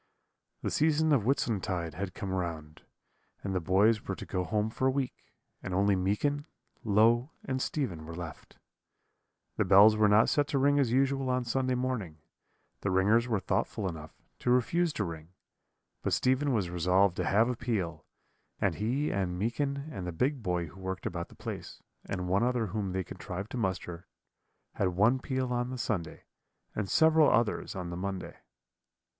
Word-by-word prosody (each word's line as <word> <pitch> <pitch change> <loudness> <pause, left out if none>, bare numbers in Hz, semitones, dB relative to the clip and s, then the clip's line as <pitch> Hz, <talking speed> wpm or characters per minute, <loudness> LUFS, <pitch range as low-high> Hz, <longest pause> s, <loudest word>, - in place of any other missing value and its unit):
"The - - -1
season 155 0 +3
of 120 -7 +2
Whitsuntide 95 - 0
had 95 +2 -5
come 100 -3 -4
round, 80 -4 -4 0.6
and 95 - -2
the 95 - +1
boys 100 +6 +3
were 95 - -2
to - - -8
go 90 -1 -2
home 105 +3 -1
for 130 - 0
a - - +3
week, 135 -1 -4 0.3
and 95 - -4
only 100 +1 +3
Meekin, 140 - 0 0.4
Low, 115 +4 +4 0.2
and 130 -1 -2
Stephen 90 - -3
were 85 - -7
left. 85 -2 -9 1.0
The - - +3
bells 100 +3 +7
were 110 0 +4
not 105 +2 +5
set 145 -1 +2
to 140 - 0
ring 145 +1 +3
as 130 -5 +2
usual 135 +1 +1
on 125 0 +1
Sunday 130 +1 0
morning; 125 -11 -2 0.6
the 100 - -2
ringers 105 +6 +3
were 110 -4 +1
thoughtful 95 +1 -1
enough 80 -3 -8 0.2
to - - -2
refuse 160 +8 +2
to 110 - -1
ring; 80 -1 -7 0.7
but - - -1
Stephen 130 +3 +2
was 100 -8 0
resolved 90 +2 +3
to - - 0
have 110 +4 +3
a 125 - -1
peal, 110 -9 -2 0.6
and - - +1
he 130 +8 -1
and 90 -2 -1
Meekin 140 +7 -2
and 95 -10 -5
the - - -2
big 130 - 0
boy 90 -4 -1
who 85 +5 -13
worked 95 0 -4
about 85 -1 -4
the - - -16
place, - - -7 0.2
and 90 -1 -3
one 95 +3 +2
other 120 -1 +1
whom 100 -1 -3
they 95 0 -1
contrived 95 +3 -7
to - - -4
muster, 90 -4 -3 0.7
had 100 - 0
one 115 +6 +4
peal 130 -1 -2
on 120 0 -1
the 130 - -5
Sunday, 95 -9 -3 0.5
and 105 -2 -3
several 160 - +5
others 115 -2 +1
on 90 -2 -5
the - - -4
Monday. 95 +1 -5
105 Hz, 180 wpm, -30 LUFS, 90-130 Hz, 1.0 s, bells